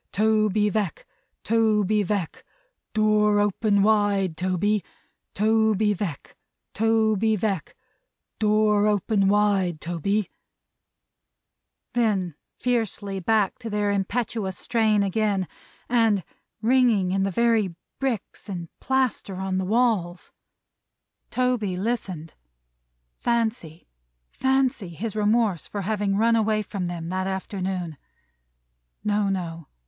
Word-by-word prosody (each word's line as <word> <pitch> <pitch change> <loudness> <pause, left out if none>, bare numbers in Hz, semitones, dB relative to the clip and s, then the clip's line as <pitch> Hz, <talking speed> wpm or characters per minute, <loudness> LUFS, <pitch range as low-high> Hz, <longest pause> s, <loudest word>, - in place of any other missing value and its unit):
Toby 215 0 +2
Veck, 205 -4 -2 0.4
Toby 215 -2 +2
Veck, 195 -4 -3 0.5
door 210 -1 +3
open 205 0 +2
wide 205 -4 +2
Toby, 185 +4 0 0.5
Toby 215 0 +3
Veck, 175 -7 -5 0.4
Toby 220 0 +2
Veck, 195 -5 -2 0.6
door 210 -1 +3
open 205 -1 +2
wide 195 -5 +2
Toby 190 +5 -1 0.8
" - - -57
then 205 -8 +1 0.2
fiercely 215 -5 -1
back 210 +3 +1
to 230 -2 -6
their 205 -1 0
impetuous 200 -1 -2
strain 220 -3 +2
again, 200 -2 0 0.4
and 225 -5 +2 0.4
ringing 230 -6 +3
in 195 +1 +1
the 195 - +1
very 220 -3 +1 0.2
bricks 240 -5 -3
and 175 -4 -5
plaster 260 -7 0
on 190 0 -2
the 190 - -2
walls. 205 -5 0 1.0
Toby 245 -7 0
listened. 185 -7 -3 0.9
Fancy, 225 -9 -1 0.4
fancy! 265 -7 0
His 205 +6 -5
remorse 210 -4 +1
for 205 - -4
having 205 -1 0
run 230 +2 +3
away 215 -1 +1
from 195 -3 -4
them 170 -1 -5
that 185 +1 -2
afternoon! 190 -4 -3 1.1
No, 205 -1 +1
no. 170 -4 -4
205 Hz, 105 wpm, -25 LUFS, 190-220 Hz, 1.1 s, door